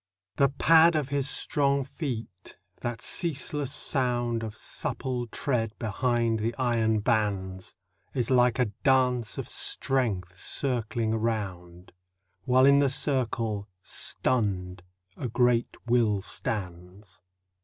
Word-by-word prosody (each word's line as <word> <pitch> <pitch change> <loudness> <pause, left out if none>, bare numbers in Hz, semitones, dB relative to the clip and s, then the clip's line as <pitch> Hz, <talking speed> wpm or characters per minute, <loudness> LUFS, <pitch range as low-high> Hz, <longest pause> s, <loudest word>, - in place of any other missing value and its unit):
The 140 -1 +4
pad 165 +3 +5
of 150 -3 -1
his 140 0 0
strong 140 -2 +1
feet, 115 - -7 0.2
that 120 0 -5
ceaseless 150 -4 0
sound 120 -4 0
Of 110 -2 -6
supple 125 +1 -3
tread 115 -3 -2
behind 115 0 0
the 115 +2 -2
iron 115 -4 +1
bands, 100 -5 -1 0.4
Is 125 -1 -1
like 125 -2 +4
a 125 -5 +1
dance 125 -4 +2
of - - -4
strength 105 -10 0
circling 115 +1 -1
around, 95 -6 -4 0.5
While 130 0 +4
in 140 0 +6
the 140 -1 +3
circle, 115 -7 0 0.2
stunned, 95 -7 -1 0.4
a 125 - -3
great 120 0 +1
will 115 -5 +2
stands. 95 -1 -5
120 Hz, 110 wpm, -27 LUFS, 105-130 Hz, 0.5 s, in